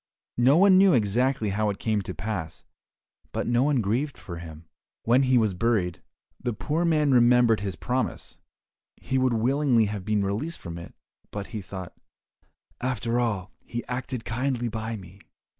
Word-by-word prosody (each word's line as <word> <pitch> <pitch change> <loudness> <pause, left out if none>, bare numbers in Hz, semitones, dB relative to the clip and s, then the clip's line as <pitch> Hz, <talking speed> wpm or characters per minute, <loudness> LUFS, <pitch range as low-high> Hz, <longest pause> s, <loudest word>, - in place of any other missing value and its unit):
No 130 +5 +5
one 190 0 +7
knew 195 -1 +6
exactly 120 +1 +1
how 105 +2 0
it 100 - -3
came 110 -2 0
to 95 - -7
pass, 95 -5 -5 0.7
but - - -2
no 120 0 +2
one 140 -2 +2
grieved 125 +8 -1
for 85 -3 -8
him. 80 -1 -10 0.4
When 120 +3 +4
he 130 -1 +3
was 110 -4 +2
buried, 90 -3 0 0.4
the 120 -1 -1
poor 155 +9 -1
man 155 -3 +3
remembered 120 -2 +5
his 100 -2 -4
promise; 125 +7 -3 0.6
he 130 - -1
would 130 -1 +2
willingly 125 0 +3
have 105 -2 -4
been 105 0 0
released 130 +13 -2
from 85 0 -7
it, 85 - -11 0.3
but 100 -1 -5
he 110 - -3
thought, 95 -2 -8 0.9
"After 120 -1 -1
all, 105 -5 -1
he 120 0 -5
acted 125 -1 -4
kindly 120 0 -1
by 110 +1 -4
me. 95 -1 -12
115 Hz, 165 wpm, -26 LUFS, 100-130 Hz, 0.9 s, one